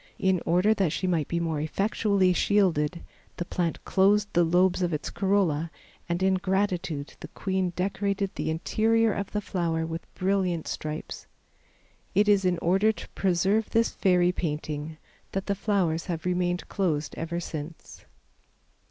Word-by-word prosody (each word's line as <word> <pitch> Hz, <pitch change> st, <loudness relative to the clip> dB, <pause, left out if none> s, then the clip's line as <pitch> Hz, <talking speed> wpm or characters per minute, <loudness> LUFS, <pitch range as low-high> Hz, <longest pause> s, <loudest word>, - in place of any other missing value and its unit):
In 190 Hz, -2 st, +1 dB
order 180 Hz, +6 st, +4 dB
that 195 Hz, -7 st, +1 dB
she 185 Hz, -, -2 dB
might 170 Hz, -5 st, +1 dB
be 170 Hz, -, -1 dB
more 160 Hz, -3 st, -1 dB
effectually 195 Hz, +2 st, +1 dB
shielded, 175 Hz, -5 st, +1 dB, 0.3 s
the 175 Hz, -, -3 dB
plant 175 Hz, -2 st, -2 dB
closed 205 Hz, +2 st, +3 dB
the 175 Hz, -, +4 dB
lobes 180 Hz, +2 st, +3 dB
of 175 Hz, -2 st, 0 dB
its 150 Hz, -, -3 dB
corolla 185 Hz, -6 st, +1 dB, 0.4 s
and 175 Hz, +2 st, 0 dB
in 190 Hz, 0 st, +4 dB
gratitude 185 Hz, -6 st, -1 dB
the -, -, -8 dB
queen 190 Hz, -1 st, -1 dB
decorated 200 Hz, +1 st, -1 dB
the -, -, -3 dB
interior 220 Hz, +7 st, +2 dB
of 200 Hz, 0 st, -4 dB
the 210 Hz, -, -1 dB
flower 165 Hz, -5 st, -1 dB
with 165 Hz, 0 st, -6 dB
brilliant 185 Hz, -3 st, 0 dB
stripes. 155 Hz, 0 st, -5 dB, 0.9 s
It 205 Hz, +2 st, +4 dB
is 200 Hz, -2 st, +4 dB
in 180 Hz, -1 st, +2 dB
order 195 Hz, +5 st, +3 dB
to 220 Hz, -, -10 dB
preserve 195 Hz, +4 st, +1 dB
this 230 Hz, 0 st, +2 dB
fairy 180 Hz, -2 st, +3 dB
painting 155 Hz, -2 st, -4 dB, 0.4 s
that 195 Hz, 0 st, -2 dB
the 200 Hz, -, 0 dB
flowers 190 Hz, -5 st, 0 dB
have 170 Hz, -2 st, -4 dB
remained 180 Hz, 0 st, 0 dB
closed 155 Hz, -7 st, -1 dB
ever 170 Hz, +1 st, -3 dB
since. 160 Hz, -1 st, -8 dB
180 Hz, 150 wpm, -27 LUFS, 165-195 Hz, 0.9 s, order